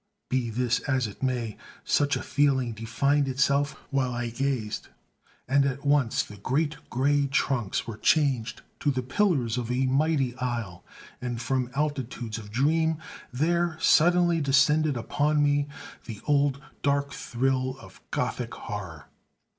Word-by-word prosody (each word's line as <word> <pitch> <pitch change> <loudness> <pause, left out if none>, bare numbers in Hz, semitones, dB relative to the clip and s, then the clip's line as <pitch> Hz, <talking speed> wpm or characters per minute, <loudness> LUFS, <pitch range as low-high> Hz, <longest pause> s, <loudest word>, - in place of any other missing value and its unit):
Be 125 -2 0
this 120 +1 +1
as 130 -2 +2
it 105 - -8
may, 125 -5 -1 0.3
such 145 0 +2
a - - -3
feeling 135 -4 +2
defined 135 +6 +1
itself 140 +2 +2 0.2
while 135 -2 +1
I 120 -1 -3
gazed; 125 -4 -2 0.6
and 140 +2 +4
at 140 +1 -2
once 140 -5 +3
the 105 - -11
great 145 +8 0
grey 140 +2 +2
trunks 135 -6 0
were 115 -2 -6
changed 125 -6 +1 0.2
to 145 - +1
the 130 -2 0
pillars 130 - +1
of 120 -1 -4
a 130 +2 +1
mighty 135 -1 +1
aisle; 115 -8 -3 0.4
and 120 -2 -3
from 125 +1 -1
altitudes 130 -6 -2
of 105 -1 -10
dream 160 +7 +2 0.3
there 170 +5 +1
suddenly 175 +1 +4
descended 150 +1 +3
upon 145 +5 +1
me 145 0 +2 0.4
the 110 -4 -7
old 140 -2 +2 0.2
dark 140 0 +1
thrill 130 +1 -1
of - - -15
Gothic - - -2
horror. 85 -8 -7
135 Hz, 140 wpm, -27 LUFS, 120-145 Hz, 0.6 s, and